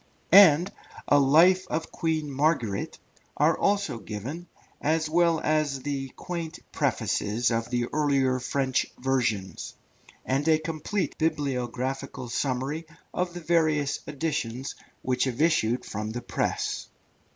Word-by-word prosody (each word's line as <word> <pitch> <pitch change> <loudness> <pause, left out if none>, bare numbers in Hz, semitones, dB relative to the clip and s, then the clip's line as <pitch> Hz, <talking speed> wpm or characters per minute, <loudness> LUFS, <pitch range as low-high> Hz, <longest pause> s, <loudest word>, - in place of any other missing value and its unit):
and 180 -2 +8 0.4
a 145 - +5
Life 170 +7 +5
of 160 +1 -3
Queen 155 -3 -1
Margaret, 135 -8 0 0.4
are 155 +2 +4
also 200 - 0
given, 130 - -6 0.3
as 160 +1 +1
well 165 0 +3
as 150 -4 0
the 140 -2 -3
quaint 170 -3 -5
Prefaces 115 +4 0
of 115 +1 -1
the 120 -1 0
earlier 135 -4 +2
French 130 0 0
versions; 115 -9 -1 0.5
and 135 +4 0
a 160 -1 +5
complete 165 +5 -3
bibliographical 135 -4 -2
summary 135 +6 -2 0.3
of 180 -1 -2
the 175 - -5
various 155 -4 +1
editions 140 -4 -3 0.3
which 130 0 +1
have 130 -1 -3
issued 150 -7 +2
from 105 +1 -4
the 120 - -4
press. - - -2
145 Hz, 120 wpm, -27 LUFS, 130-160 Hz, 0.5 s, and